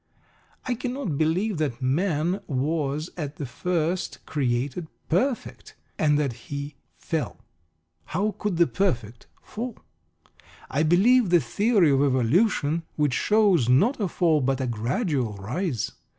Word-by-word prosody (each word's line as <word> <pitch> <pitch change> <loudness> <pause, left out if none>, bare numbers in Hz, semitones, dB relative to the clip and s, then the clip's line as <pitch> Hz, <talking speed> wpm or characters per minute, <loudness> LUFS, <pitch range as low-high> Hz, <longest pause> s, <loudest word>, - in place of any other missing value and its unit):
I 255 - 0
cannot 245 - -3
believe 170 +4 +1
that 135 -6 -1
man 165 +6 0
was 150 +2 -1
at 150 -3 -4
the 145 - -5
first 170 +6 -2
created 135 +3 -1 0.2
"perfect," 230 - -1 0.2
and 150 -2 +3
that 140 -4 0 0.2
he 145 +1 -4 0.2
"fell." - - -3 0.7
(How 205 +6 -1
could 205 -5 -1
the 170 - +6
perfect 120 - -2 0.2
fall?) 235 +2 -6 0.9
I 140 - +1
believe 195 +8 +4
the 175 0 +5
theory 195 - +2
of 135 0 +3
evolution, 145 - +2
which 150 -4 +1
shows 195 - +3
not 205 - +4
a 200 - +1
fall 165 -3 +2
but 135 0 0
a 130 - -1
gradual 125 - -1
rise. 120 - -3
155 Hz, 130 wpm, -25 LUFS, 135-190 Hz, 0.9 s, the